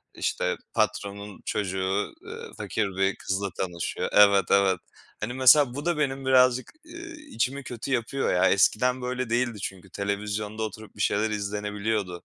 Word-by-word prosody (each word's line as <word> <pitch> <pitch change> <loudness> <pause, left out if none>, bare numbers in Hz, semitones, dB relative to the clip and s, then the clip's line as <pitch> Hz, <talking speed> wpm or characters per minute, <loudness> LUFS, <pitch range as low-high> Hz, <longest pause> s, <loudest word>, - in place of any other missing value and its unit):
işte, - - -1 0.2
patronun 100 0 -2
çocuğu, 95 - -1
eee, 460 +1 -8
fakir 105 -2 -1
bir 95 0 +2
kızla 95 +1 -2
tanışıyor. 85 -3 -3
Evet, 100 -3 +6
evet. 95 -2 +4 0.4
Hani, 115 +3 -3
mesela 130 0 +6
bu 145 +3 -5
da 175 -2 +1
benim 135 -2 -1
birazcık, 130 -1 +4
eee, 335 +1 -9 0.2
içimi 140 - -1
kötü 120 +2 -6
yapıyor 130 +2 0
ya. 90 - +4
Eskiden 125 +6 +3
böyle 125 -1 -3
değildi 120 -2 0
çünkü 95 0 -6
televizyonda 105 +2 -3
oturup 110 0 -7
bir 105 - -5
şeyler 105 +3 +2
izlenebiliyordu. 105 -2 -2
105 Hz, 145 wpm, -26 LUFS, 100-130 Hz, 0.4 s, Evet